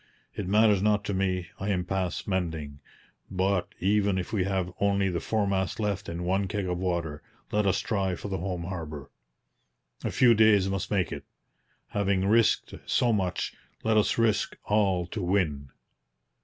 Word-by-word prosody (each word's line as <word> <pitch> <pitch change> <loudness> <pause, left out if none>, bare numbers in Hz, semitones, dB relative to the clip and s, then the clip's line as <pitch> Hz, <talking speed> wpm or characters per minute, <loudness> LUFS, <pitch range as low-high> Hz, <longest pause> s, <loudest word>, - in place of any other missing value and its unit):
'It 100 - -4
matters 105 0 +4
not 105 0 +2
to 100 - -2
me. 90 -3 -1
I 95 - -2
am 90 -3 0
past 95 -1 -2
mending; 80 -7 -2 0.5
but 95 0 0
even 100 0 +2
if 90 +3 -4
we 95 -4 +1
have 95 -2 -1
only 100 -1 +2
the 85 -2 -1
foremast 100 0 -1
left 105 -3 -2
and 85 +1 -4
one 95 +2 +1
keg 100 -1 -2
of 90 -1 -2
water, 85 -5 -2 0.3
let 105 -1 +2
us 95 - +2
try 95 -4 -1
for - - -7
the 95 -1 -3
home 90 -1 -3
harbour. 80 -6 -6 0.9
A - - 0
few 120 -2 +5
days 105 -3 +5
must 95 0 -2
make 95 -4 0
it. - - -5 0.7
Having 100 -2 +1
risked 110 +2 +3
so 120 -2 +2
much, 95 -4 -1 0.3
let 110 0 +2
us 105 - +3
risk 115 -2 +1
all 100 -4 +2
to 100 +4 -5
win!' 85 -7 0
95 Hz, 170 wpm, -28 LUFS, 90-105 Hz, 0.9 s, few